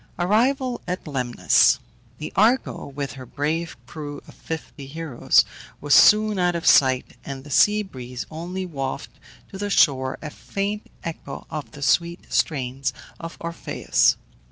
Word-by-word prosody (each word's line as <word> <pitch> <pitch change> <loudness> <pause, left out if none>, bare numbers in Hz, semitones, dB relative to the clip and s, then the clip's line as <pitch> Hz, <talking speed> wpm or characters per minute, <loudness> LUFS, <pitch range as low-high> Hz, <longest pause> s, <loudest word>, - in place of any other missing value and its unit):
ARRIVAL 240 +7 +1
AT 180 +1 -3
LEMNOS. 120 - +3 0.4
The 150 - -7
Argo, 230 +6 +2
with 140 0 -5
her 130 -1 -9
brave 160 +4 -2
crew 145 +1 -7
of - - -13
fifty 155 -3 -7
heroes, 155 -3 +2 0.3
was 145 -1 +1
soon 210 -1 +6
out 175 -1 +2
of 170 - -3
sight, 130 -2 +4
and 135 -1 -7
the 145 - -11
sea 210 - +4
breeze 125 -8 -7
only 180 +4 -5
wafted 135 -6 -5 0.3
to 190 - -8
the 205 0 -2
shore 130 -8 +3
a 150 - -7
faint 200 +5 -4 0.2
echo 160 -4 -7
of 155 -1 -6
the 145 -1 -7
sweet 170 +4 +1
strains 135 -3 0 0.3
of 165 0 -8
Orpheus. 170 0 +1
155 Hz, 145 wpm, -23 LUFS, 135-185 Hz, 0.4 s, soon